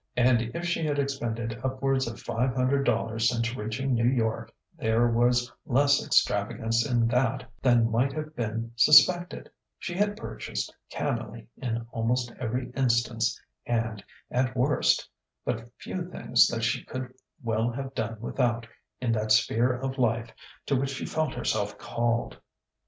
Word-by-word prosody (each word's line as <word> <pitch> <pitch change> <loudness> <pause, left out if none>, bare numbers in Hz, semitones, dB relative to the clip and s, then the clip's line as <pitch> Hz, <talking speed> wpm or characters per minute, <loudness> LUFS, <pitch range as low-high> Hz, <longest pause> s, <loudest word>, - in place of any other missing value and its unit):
And 125 -1 +4
if 170 - -3
she 170 -1 0
had 150 -2 0
expended 115 -5 -2
upwards 130 0 0
of 115 - -6
five 125 +3 -1
hundred 135 +2 +2
dollars 115 +1 +1
since 115 0 -1
reaching 125 +5 -2
New 115 0 +2
York, 115 -4 -1 0.2
there 115 +2 +2
was 120 +1 +2
less 140 0 +3
extravagance 115 +1 +2
in 120 -4 +2
that 125 -1 +1 0.2
than 120 -3 +4
might 125 +5 +2
have 155 0 -5
been 115 0 -3
suspected; 175 +7 +5 0.3
she 175 - -5
had 205 +3 0
purchased - - -5
cannily 110 +1 -3
in 115 -2 -3
almost 120 +1 0
every 125 +1 -3
instance 120 -3 +1 0.3
and, 115 -3 -1 0.3
at 130 +1 0
worst, 135 +5 +2 0.4
but 115 +1 -3
few 180 -1 -5
things 125 -8 +3
that 115 -1 -2
she 120 - 0
could 130 -1 -6 0.3
well 115 0 +1
have 135 +2 -5
done 110 -2 -3
without 120 -1 0 0.3
in 125 -2 0
that 110 -1 0
sphere 115 +3 +4
of 130 +2 -4
life 115 -1 +1 0.3
to 140 - +1
which 135 +1 0
she 135 - -4
felt 155 -3 -1
herself 105 -1 -1
called. 120 0 -1
120 Hz, 150 wpm, -27 LUFS, 115-135 Hz, 0.4 s, suspected